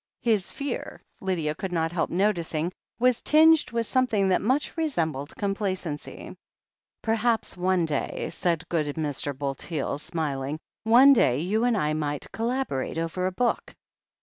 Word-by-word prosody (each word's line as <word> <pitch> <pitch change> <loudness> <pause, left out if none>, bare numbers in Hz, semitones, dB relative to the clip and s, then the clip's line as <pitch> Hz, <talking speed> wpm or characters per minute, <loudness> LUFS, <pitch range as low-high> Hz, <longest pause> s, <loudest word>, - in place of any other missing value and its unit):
His 215 -6 +1
fear, 280 -3 -5 0.2
Lydia 170 -6 -1
could 185 +4 -5
not 165 -2 0
help 175 -1 -1
noticing, 175 -4 0 0.3
was 250 0 +2
tinged 315 +1 +5
with 230 -1 -1
something 220 -6 +2
that 185 - +3
much 260 +7 0
resembled 160 - -2
complacency. 190 -6 -4 0.7
"Perhaps, 225 0 0
one 180 -1 +1
day," 150 -3 -2
said 170 -3 -1
good 160 -3 0
Mr. 145 -3 -2
Bulteel, 140 +1 -3
smiling, 145 -3 -3 0.3
"one 250 +5 +8
day, 125 - +3
you 210 +8 +1
and 240 -3 +2
I 150 -5 +1
might 145 -2 -3
collaborate 230 - -2
over 165 +3 -1
a - - -1
book." 240 +5 -1
185 Hz, 140 wpm, -26 LUFS, 155-230 Hz, 0.7 s, one